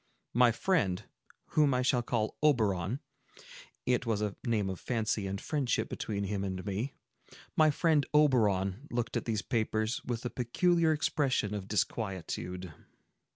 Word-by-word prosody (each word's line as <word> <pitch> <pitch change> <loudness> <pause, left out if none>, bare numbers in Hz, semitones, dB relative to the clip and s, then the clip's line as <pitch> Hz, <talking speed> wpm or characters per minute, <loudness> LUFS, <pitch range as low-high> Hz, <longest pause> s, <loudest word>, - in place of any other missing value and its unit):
My 120 0 +6
friend, 110 - +1 0.5
whom 145 -4 +3
I 125 - +1
shall 125 -1 +3
call 115 -2 -1
Oberon,—it 120 - -1
was 115 -3 0
a 105 -2 -2
name 110 -5 +1
of 95 -2 -4
fancy 110 -4 -1
and 95 +1 -3
friendship 130 -6 -1
between 100 -2 -3
him 100 0 -2
and 95 -1 -4
me,—my 125 +8 -2
friend 150 0 +3
Oberon 115 -6 +3
looked 120 -1 -2
at - - -1
these 110 -3 -1
papers 110 -1 -1
with 120 0 -4
a 125 - -2
peculiar 165 +7 +2
expression 140 -8 +1
of 100 -2 -4
disquietude. 95 -4 -3
115 Hz, 135 wpm, -31 LUFS, 100-130 Hz, 0.5 s, My